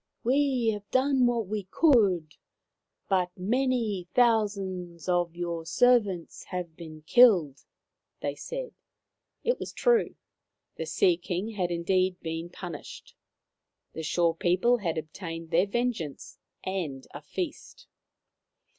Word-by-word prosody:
" - - -51
We 260 -2 +2
have 205 -1 -4
done 260 -1 +3
what 235 -2 0
we 205 -1 -3
could, 195 - +3 0.7
but 185 -2 +2
many 225 -2 0
thou 230 -3 +5
sands 185 -4 -7
of 175 -2 +1
your 170 -1 -3
servants 200 -1 +2
have 180 -3 -5
been 155 -2 -10
killed/ 175 - +5 0.3
' - - -58
they - - -1
said. - - -6 0.7
It 485 +1 +1
was - - -5
true. 480 -2 +2 0.6
The - - -5
Sea 365 -4 +3
King 190 - -3
had 185 -5 -1
indeed 180 +2 +1
been 165 +1 -4
punished. 175 -3 -9 0.8
The 160 - -5
Shore 165 +1 +1
people 185 +9 +2
had 170 -7 -2
obtained 165 +1 -6
their 175 +4 +3
vengeance 220 - -3 0.2
and 165 -9 -4
a 145 - -7
feast. 350 - -6
185 Hz, 130 wpm, -28 LUFS, 170-240 Hz, 0.8 s, thou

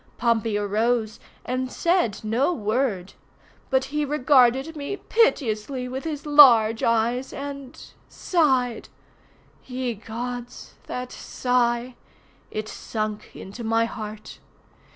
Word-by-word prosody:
Pompey 230 -3 +1
arose, 215 +2 0 0.3
and 255 0 -2
said 340 - +1
no 235 +9 +1
word. 215 - -1 0.6
But 265 -1 +2
he 300 +3 -2
regarded 270 0 +3
me 295 +7 -4
piteously 255 - 0
with 265 +4 -5
his 300 -3 -4
large 240 -7 +7
eyes 235 +3 +1
and—sighed. 275 -1 -2 0.7
Ye 250 -1 -3
Gods—that 245 +2 -7
sigh! 245 0 -1 0.6
It 215 0 -4
sunk 215 -1 -5
into 205 +5 -9
my 225 +1 +2
heart. 215 -2 -8
245 Hz, 95 wpm, -24 LUFS, 220-270 Hz, 0.7 s, large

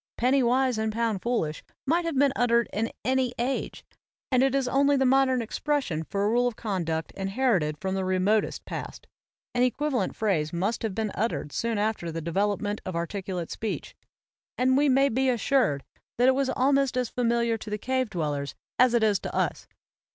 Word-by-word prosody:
"Penny 260 +3 +3
wise 250 -1 +2
and 220 0 0
pound 225 -3 -1
foolish" 195 -11 -1 0.2
might 335 +5 +1
have 330 -5 -2
been 275 0 +4
uttered 235 -1 +3
in 225 +2 -1
any 255 -1 +1
age; 255 +3 -3 0.5
and 255 -1 +4
it 270 0 +2
is 270 -2 +1
only 280 +2 +3
the 265 - +2
modern 260 -1 +3
expression 240 - -1
for 200 +4 -2
a - - +2
rule 245 +2 +3
of 245 - -3
conduct 170 -8 -2
inherited 195 - 0
from 190 +3 -3
the 190 0 -1
remotest 185 +3 +1
past. - - -7 0.5
An 245 - +1
equivalent 255 -3 0
phrase 170 -8 0
must 190 +7 -1
have 220 -4 -3
been 220 -2 -1
uttered 215 -8 -2
soon 230 +5 -1
after 205 -5 -1
the 165 - -4
development 205 +5 -1
of 185 - -5
articulate 180 0 -4
speech; 220 - -4 0.6
and 260 +1 +3
we 285 +1 +4
may 270 +1 +4
be 265 +1 +1
assured 235 - +1 0.3
that 245 +2 +4
it 260 - +6
was 270 0 0
al 270 +2 +3
;is 275 -2 +1 0.2
familiar 235 -1 +1
to 215 - -8
the 210 - -2
cave 260 +2 -1
dwellers 145 -6 -3 0.2
as 250 -1 +5
it 235 - +3
is 210 -3 +3
to - - -6
us. - - -1
230 Hz, 190 wpm, -27 LUFS, 195-260 Hz, 0.6 s, it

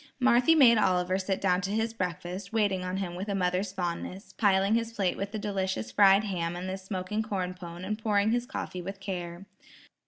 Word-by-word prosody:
Marthy 255 +4 +5
made 240 -7 +7
Oliver 185 -1 +2
sit 190 0 -1
down 180 -1 +2
to 190 - -3
his 225 +2 -1
breakfast, 180 -1 -4
waiting 205 -4 +1
on 185 +1 -3
him 190 -3 -3
with 190 +4 -5
a 200 - 0
mother's 185 +1 0
fondness, 185 +2 -5
piling 195 -1 +3
his 230 0 0
plate 195 -5 0
with 200 0 -4
the 215 - -4
delicious 190 - -2
fried 200 0 +6
ham 175 -4 -2
and 180 +1 -5
the 190 - -2
smoking 190 +2 -3
corn 190 -4 -3
pone, 175 0 -8
and 215 +2 -3
pouring 210 -1 +2
his 240 +1 0
coffee 180 -7 -5
with 195 +2 -7
care. 180 -2 -5
195 Hz, 200 wpm, -28 LUFS, 180-210 Hz, -, made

